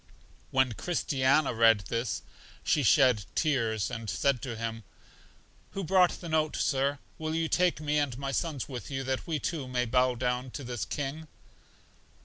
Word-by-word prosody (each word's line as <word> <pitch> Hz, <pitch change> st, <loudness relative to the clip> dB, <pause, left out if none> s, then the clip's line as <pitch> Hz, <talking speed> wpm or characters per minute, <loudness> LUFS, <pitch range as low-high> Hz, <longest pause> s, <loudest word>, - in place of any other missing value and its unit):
When 130 Hz, -1 st, +2 dB
Christiana 140 Hz, -1 st, +1 dB
read 115 Hz, -2 st, +5 dB
this, 115 Hz, +2 st, -3 dB, 0.4 s
she 150 Hz, -, +2 dB
shed 125 Hz, -5 st, +4 dB
tears, 115 Hz, -, +1 dB
and 115 Hz, -2 st, -5 dB
said 140 Hz, 0 st, +1 dB
to 120 Hz, -3 st, -4 dB
him 115 Hz, 0 st, -4 dB, 0.9 s
who 195 Hz, -, -3 dB
brought 180 Hz, +1 st, +3 dB
the 175 Hz, -, -6 dB
note, 155 Hz, -1 st, +1 dB
Sir, 140 Hz, 0 st, +1 dB, 0.2 s
will 155 Hz, 0 st, -2 dB
you 165 Hz, 0 st, +1 dB
take 180 Hz, 0 st, +2 dB
me 150 Hz, -1 st, +1 dB
and 135 Hz, -5 st, -1 dB
my 135 Hz, 0 st, -3 dB
sons 145 Hz, -2 st, -2 dB
with 125 Hz, -4 st, -7 dB
you, 135 Hz, -1 st, -3 dB
that 130 Hz, +4 st, -2 dB
we, 160 Hz, -2 st, 0 dB
too, 150 Hz, -2 st, -3 dB
may 125 Hz, -1 st, 0 dB
bow 125 Hz, +1 st, +2 dB
down 125 Hz, +1 st, -1 dB
to 140 Hz, -, -8 dB
this 120 Hz, -3 st, -3 dB
king? 145 Hz, +3 st, -4 dB
135 Hz, 165 wpm, -29 LUFS, 120-155 Hz, 0.9 s, read